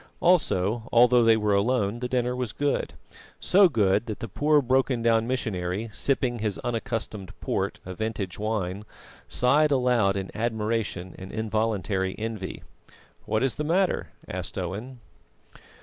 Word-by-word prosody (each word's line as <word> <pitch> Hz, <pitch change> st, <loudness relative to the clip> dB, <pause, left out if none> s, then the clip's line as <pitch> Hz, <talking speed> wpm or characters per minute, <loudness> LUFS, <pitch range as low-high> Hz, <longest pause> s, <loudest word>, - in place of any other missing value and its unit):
Also, 115 Hz, -, +2 dB
although 120 Hz, 0 st, +6 dB
they 115 Hz, -1 st, +5 dB
were 105 Hz, -1 st, +1 dB
alone, 105 Hz, +1 st, +1 dB
the 125 Hz, -, -2 dB
dinner 125 Hz, 0 st, 0 dB
was 125 Hz, -4 st, -3 dB
good 145 Hz, 0 st, -1 dB, 0.4 s
so 195 Hz, 0 st, +5 dB
good 105 Hz, -, +2 dB
that 110 Hz, -, -5 dB
the 115 Hz, -, -5 dB
poor 150 Hz, +8 st, +3 dB
broken 130 Hz, -2 st, +1 dB
down 115 Hz, -1 st, +3 dB
missionary, 105 Hz, -4 st, -2 dB
sipping 125 Hz, -2 st, 0 dB
his 105 Hz, -2 st, -2 dB
unaccustomed 115 Hz, -4 st, -4 dB
port, -, -, -2 dB
a 95 Hz, -, -6 dB
vintage 100 Hz, -2 st, -4 dB
wine, 105 Hz, -2 st, -2 dB, 0.4 s
sighed 150 Hz, +5 st, +3 dB
aloud 125 Hz, -7 st, +2 dB
in 95 Hz, -1 st, -5 dB
admiration 110 Hz, -5 st, -2 dB
and 95 Hz, 0 st, -8 dB
involuntary 110 Hz, -3 st, -1 dB
envy. 110 Hz, -4 st, -5 dB, 0.6 s
"What 110 Hz, +3 st, 0 dB
is 135 Hz, -, +1 dB
the 150 Hz, -, -4 dB
matter?" 180 Hz, +5 st, +1 dB, 0.2 s
asked -, -, -5 dB
Owen. 105 Hz, +8 st, -5 dB
115 Hz, 140 wpm, -26 LUFS, 100-125 Hz, 0.6 s, although